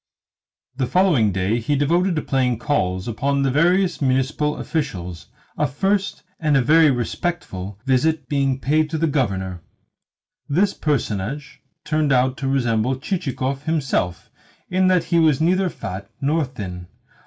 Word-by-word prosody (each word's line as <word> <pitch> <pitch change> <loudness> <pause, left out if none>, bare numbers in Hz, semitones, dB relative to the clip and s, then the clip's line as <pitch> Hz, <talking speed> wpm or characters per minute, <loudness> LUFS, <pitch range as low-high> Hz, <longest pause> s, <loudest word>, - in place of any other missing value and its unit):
The 130 -2 0
following 160 - +3
day 95 +5 0
he 130 +6 0
devoted 170 +6 +2
to 155 - -1
paying 130 -3 +1
calls 95 - -1
upon 140 +5 0
the 135 - +1
various 175 +5 +2
municipal 135 +3 0
officials 90 - -4 0.3
a 150 - +2
first, 195 +11 -1 0.2
and 150 -3 +2
a - - +4
very 155 +3 +5
respectful, 120 - -3
visit 135 +5 +1
being 135 -2 0
paid 155 +3 +1
to 160 - -2
the 165 - +1
Governor. 95 - -1 0.9
This 185 +7 +2
personage 140 -2 -2 0.3
turned 155 -1 +1
out 130 0 +3
to 135 - -3
resemble 125 -2 +1
Chichikov 135 -3 -3
himself 135 - -1 0.4
in 185 +1 +3
that 180 -2 +3
he 170 0 +1
was 155 -4 +3
neither 185 +3 +2
fat 95 - -7
nor 150 +3 +1
thin. 90 -9 -7
140 Hz, 145 wpm, -21 LUFS, 120-160 Hz, 0.9 s, very